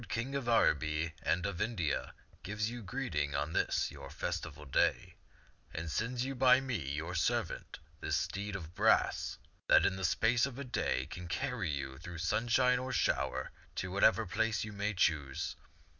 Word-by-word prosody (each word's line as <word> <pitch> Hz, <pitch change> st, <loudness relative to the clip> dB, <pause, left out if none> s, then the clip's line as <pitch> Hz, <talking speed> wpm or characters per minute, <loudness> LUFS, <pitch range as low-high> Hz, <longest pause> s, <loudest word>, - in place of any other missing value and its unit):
King 120 Hz, +6 st, -2 dB
of 135 Hz, -4 st, -2 dB
Araby 80 Hz, -6 st, +2 dB
and 90 Hz, +1 st, +1 dB
of 100 Hz, -3 st, -2 dB
India, 90 Hz, -, -1 dB, 0.3 s
gives 105 Hz, +4 st, -2 dB
you 120 Hz, 0 st, -6 dB
greeting 90 Hz, -, -2 dB
on 75 Hz, +3 st, -1 dB
this -, -, +1 dB
your 70 Hz, -1 st, -9 dB
festival 80 Hz, -1 st, -4 dB
day; 65 Hz, -, +1 dB, 0.6 s
and 80 Hz, 0 st, -3 dB
sends 120 Hz, -, -1 dB
you 135 Hz, -, -2 dB
by 130 Hz, 0 st, +6 dB
me, 130 Hz, -3 st, -2 dB, 0.2 s
your 80 Hz, +4 st, -4 dB
servant, 80 Hz, -, -1 dB, 0.2 s
this -, -, 0 dB
steed 100 Hz, +1 st, -3 dB
of 85 Hz, -3 st, -6 dB
brass -, -, +2 dB, 0.3 s
that -, -, +6 dB
in 95 Hz, -, +1 dB
the 95 Hz, -, -5 dB
space 115 Hz, +8 st, +3 dB
of 130 Hz, -2 st, -8 dB
a 140 Hz, -, -4 dB
day 95 Hz, -, -1 dB
can 85 Hz, +4 st, -7 dB
carry 125 Hz, -1 st, -2 dB
you 70 Hz, -2 st, -4 dB
through 85 Hz, 0 st, -8 dB
sunshine 120 Hz, +8 st, +2 dB
or 130 Hz, +1 st, -4 dB
shower -, -, 0 dB, 0.2 s
to 95 Hz, -, -3 dB
whatever 100 Hz, +3 st, +4 dB
place 110 Hz, +1 st, 0 dB
you 105 Hz, -1 st, -6 dB
may 100 Hz, +1 st, -1 dB
choose. 75 Hz, -6 st, 0 dB
95 Hz, 170 wpm, -33 LUFS, 80-120 Hz, 0.6 s, by